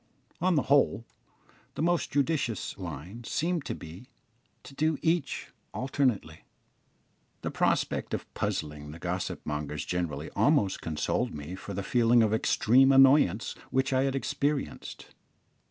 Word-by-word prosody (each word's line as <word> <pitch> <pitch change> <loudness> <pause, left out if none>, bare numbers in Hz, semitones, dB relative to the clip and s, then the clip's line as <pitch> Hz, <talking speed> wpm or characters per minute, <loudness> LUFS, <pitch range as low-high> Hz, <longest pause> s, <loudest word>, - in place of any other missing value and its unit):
On 185 0 +3
the 145 - +2
whole, 130 -5 +3 0.7
the - - -2
most 175 0 +1
judicious 140 - -1
line 90 - -7
seemed 165 +5 -1
to - - -3
be 90 - -11 0.5
to - - -12
do 155 +2 +1
each 165 -2 0 0.2
alternately. 125 - -1 1.0
The - - -2
prospect - - 0
of - - -9
puzzling 75 -1 -3
the 75 - -8
gossip 90 +2 -4
mongers 75 0 -3
generally 90 -4 -3
almost 95 -2 +2
consoled 80 -1 -1
me 75 +4 -7
for 95 +1 -7
the 100 - -3
feeling 120 +2 +4
of 110 -1 +1
extreme 130 +4 +4
annoyance 135 - +5 0.2
which 130 +1 +1
I 130 +1 +3
had 135 0 -1
experienced. 140 +1 -3
115 Hz, 135 wpm, -29 LUFS, 90-140 Hz, 1.0 s, annoyance